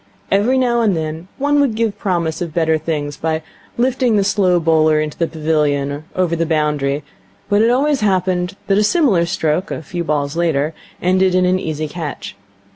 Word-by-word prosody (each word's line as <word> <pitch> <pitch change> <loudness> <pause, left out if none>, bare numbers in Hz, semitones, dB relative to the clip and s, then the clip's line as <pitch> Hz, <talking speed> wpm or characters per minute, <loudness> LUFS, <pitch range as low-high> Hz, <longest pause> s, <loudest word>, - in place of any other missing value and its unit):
Every 215 +7 +3
now 240 -2 +2
and 205 -6 +2
then 160 +2 -4
one 290 +1 +2
would 260 -6 +1
give 225 -2 -1
promise 170 -4 -1
of 170 -3 -4
better 160 -2 +2
things 145 -3 -3
by 160 0 -2 0.3
lifting 250 -1 +1
the 200 - +3
slow 190 -3 +2
bowler 155 -1 +3
into 155 -1 -3
the 165 - 0
pavilion 150 -3 0
or 145 +2 -7
over 180 -2 +1
the 165 - 0
boundary, 150 -2 0 0.5
but 205 +1 +3
it 225 - +4
always 275 +2 +2
happened 185 -2 0
that 195 0 +2
a - - +3
similar 210 - +3
stroke, 170 +3 -1
a - - -5
few 175 +4 -4
balls 145 -2 -1
later, 160 -3 0 0.3
ended 185 +1 +3
in 185 0 +3
an 185 +1 +2
easy 155 -2 -3
catch. 145 - -6
170 Hz, 190 wpm, -18 LUFS, 155-200 Hz, 0.5 s, it